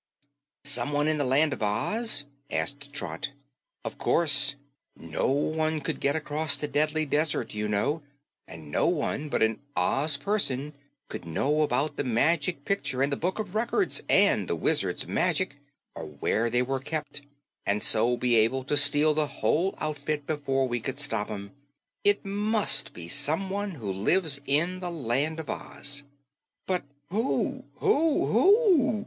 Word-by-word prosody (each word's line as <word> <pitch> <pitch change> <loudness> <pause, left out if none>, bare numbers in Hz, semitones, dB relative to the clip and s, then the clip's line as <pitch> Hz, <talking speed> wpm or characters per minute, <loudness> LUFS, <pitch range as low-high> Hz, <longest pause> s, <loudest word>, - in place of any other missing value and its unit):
"Someone 145 +1 +2
in 155 -1 0
the - - +2
Land 140 +3 +2
of - - -8
Oz?" 145 - +1 0.2
asked 140 0 -2
Trot. 140 0 -3 0.6
"Of - - -6
course. 140 -4 +3 0.4
No 80 -1 -3
one 155 +3 0
could - - -3
get 140 +2 0
across 155 -1 0
the 150 - -3
Deadly 155 +2 0
Desert, 150 +2 0
you 105 0 -2
know, 135 +10 0 0.5
and 80 -2 -11
no - - +1
one 155 -3 -1
but - - +1
an 110 0 0 0.2
Oz 140 +2 +2
person 145 -5 0 0.3
could - - -7
know 135 - 0
about 145 +1 0
the - - -1
Magic 145 +5 +1
Picture 135 -9 0
and 140 +1 0
the - - +1
Book 180 +6 -2
of 210 -4 -5
Records 240 - 0
and - - +4
the - - -1
Wizard's - - 0
magic 185 -7 0 0.4
or - - -7
where 90 +10 -1
they 125 +1 +2
were 135 +1 -2
kept, 150 +1 -5 0.4
and 100 +1 0
so 120 +3 +6
be 125 -1 +1
able 115 +4 +2
to 140 - -1
steal 145 +1 +4
the 150 0 0
whole 180 +6 0
outfit 150 -1 -3
before 135 -3 -1
we 120 -1 -2
could 130 +3 -5
stop 115 -8 -1
'em. 100 -2 -7 0.5
It 205 0 +2
MUST 210 +2 +3
be 85 -1 -9
someone 190 - 0
who 105 -8 -4
lives 140 - +1
in 170 +6 +1
the 180 -1 -4
Land 150 +1 -1
of 160 - -7
Oz." 145 -1 -2 0.6
"But 180 -5 -1 0.2
who 220 +8 -1
who 325 -7 +2
who?" 380 - +4
145 Hz, 155 wpm, -27 LUFS, 130-165 Hz, 0.6 s, so